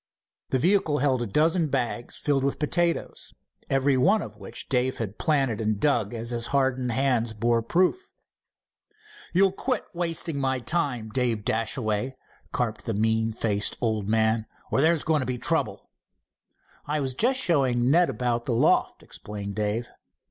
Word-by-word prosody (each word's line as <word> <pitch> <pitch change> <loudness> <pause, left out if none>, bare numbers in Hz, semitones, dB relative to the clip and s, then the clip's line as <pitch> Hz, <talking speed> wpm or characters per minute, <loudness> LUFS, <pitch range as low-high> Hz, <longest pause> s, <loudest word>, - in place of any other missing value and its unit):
The 130 - +2
vehicle 165 0 +2
held 130 -3 +1
a 120 - -2
dozen 160 - +2
bags 125 -3 -2
filled 140 -2 0
with 140 - 0
potatoes, 170 +2 -1 0.3
every 135 0 +2
one 195 +12 +3
of 105 - -9
which 100 -2 -7
Dave 130 0 0
had 110 -2 -5
planted 135 -8 +1
and 110 -1 0
dug 120 -8 +1
as 115 +1 -4
his 120 0 -2
hardened 130 -3 0
hands 120 -2 +1
bore 115 +2 +1
proof. 185 - 0 1.2
"You'll 190 +2 +4
quit 250 +5 -2
wasting 165 -3 -2
my 130 -1 0
time, 125 -6 -1
Dave 115 -4 0
Dashaway," 115 +2 -1 0.4
carped 115 -3 -2
the 115 - -1
mean 110 +1 +1
faced 105 -2 0
old 110 -4 -1
man, 110 0 +2 0.2
"or 135 - +2
there's 160 0 +3
going 155 -1 +2
to 130 - -2
be 125 -1 -2
trouble." - - 0 1.0
"I 150 +1 0
was 135 -2 -1
just 255 - +2
showing 130 - +3
Ned 175 +3 +4
about 120 -1 -1
the 125 - 0
loft," 115 - +2
explained 100 -1 -7
Dave. 105 +3 -2
125 Hz, 155 wpm, -26 LUFS, 115-150 Hz, 1.2 s, You'll